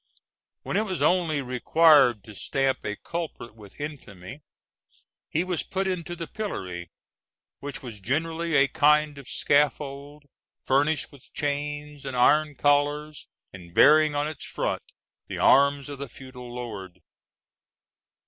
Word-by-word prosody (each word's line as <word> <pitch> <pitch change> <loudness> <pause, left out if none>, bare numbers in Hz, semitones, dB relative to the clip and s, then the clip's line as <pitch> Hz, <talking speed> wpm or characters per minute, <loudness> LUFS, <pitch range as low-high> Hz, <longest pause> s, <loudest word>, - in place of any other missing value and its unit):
When - - -2
it 215 - +1
was 190 -4 -2
only 165 -6 +2
required 130 -2 +4
to 110 - -11
stamp 135 +5 -1
a 105 - -3
culprit 165 -5 -6
with 105 -3 -16
infamy 135 - -8 0.9
he 160 - 0
was 180 -2 -1
put 190 +1 -3
into 175 -2 -3
the 170 - -5
pillory, 90 - -5 0.7
which 140 -1 -7
was 115 -5 -8
generally 160 - -1
a 140 -1 +5
kind 150 0 +3
of 135 - -12
scaffold 145 0 0 0.4
furnished 145 +3 +1
with 140 -4 -18
chains 145 0 -3
and 135 -2 -4
iron 150 +4 +4
collars, 145 +2 +1 0.3
and 85 -3 -12
bearing 155 0 +6
on 145 +1 0
its 155 -3 -7
front - - -2 0.5
the - - -5
arms 140 +1 +4
of 140 -1 -7
the 140 -2 -6
feudal 125 -1 -11
lord. 110 -7 -7
145 Hz, 135 wpm, -26 LUFS, 125-155 Hz, 0.9 s, bearing